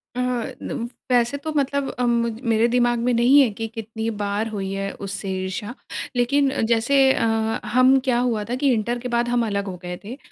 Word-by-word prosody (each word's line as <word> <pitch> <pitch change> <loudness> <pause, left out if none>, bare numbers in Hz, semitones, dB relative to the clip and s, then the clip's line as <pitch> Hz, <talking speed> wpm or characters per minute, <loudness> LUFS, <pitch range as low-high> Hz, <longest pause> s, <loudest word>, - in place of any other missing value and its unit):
अह, 250 -2 -1 0.2
नम 235 - -4 0.3
वैसे 245 +3 +2
तो 315 - -3
मतलब 280 0 0
अम, 245 -1 +2
मुज 230 -1 -3
मेरे 225 +2 +4
दिमाग 240 -1 +2
में 245 +1 +1
नहीं 245 +5 +5
है 250 - +4
कि 225 - -2
कितनी 225 0 -5
बार 205 +2 -1
हुई 195 -3 -4
है 195 0 -3
उससे 195 0 -5
ईर्ष्या। 205 +5 -4 0.4
लेकिन 275 +3 +2
अ, - - -2
जैसे 245 +5 +3
अ, - - 0 0.4
हम, 255 +4 +5
क्या 245 -2 +2
हुआ 230 -4 0
था 245 - 0
कि 275 0 +2
इंटर 235 +2 -1
के 250 - -5
बाद 240 0 +1
हम 240 -1 +1
अलग 200 -1 -1
हो 185 - -4
गए 180 0 -5
थे। 240 +6 -7
235 Hz, 210 wpm, -22 LUFS, 220-250 Hz, 0.4 s, नहीं